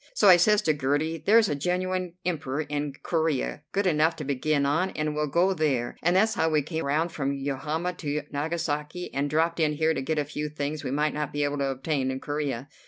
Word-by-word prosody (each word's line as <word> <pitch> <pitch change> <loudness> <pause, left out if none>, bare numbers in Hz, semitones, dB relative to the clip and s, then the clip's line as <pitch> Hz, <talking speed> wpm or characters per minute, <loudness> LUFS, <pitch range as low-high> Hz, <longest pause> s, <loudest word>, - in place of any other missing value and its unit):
So 200 - +5
I 180 - +9
says 210 +4 +4
to 155 - +3
Gertie, 145 +3 0
'There's 220 +4 +5
a - - 0
genuine 180 +3 -1
Emperor 150 -5 -1
in 145 -1 -3
Corea, 160 -4 0
good 200 0 0
enough 160 -1 +3
to 155 - -6
begin 140 +1 0
on, 160 +7 +1
and 155 0 -1
we'll 150 0 -1
go 175 +6 +2
there,' 140 -8 0
and 175 +2 +2
that's 220 +3 +4
how 160 - +1
we 155 -2 +2
came 160 +1 -3
round 155 +4 +1
from 140 -4 -2
Yokohama 145 +5 -2
to 150 -2 -2
Nagasaki, 155 +2 -3
and 140 +1 0
dropped 165 +3 +1
in 155 -2 +2
here 160 +2 +2
to - - -2
get 155 +4 -2
a 150 - +1
few 150 +1 -4
things 150 0 -4
we - - -3
might 150 +3 0
not 150 -2 -3
be 145 0 -1
able 145 0 -1
to 140 - +1
obtain 135 0 -1
in 130 0 -3
Corea. 140 -3 -3
150 Hz, 225 wpm, -27 LUFS, 145-165 Hz, -, I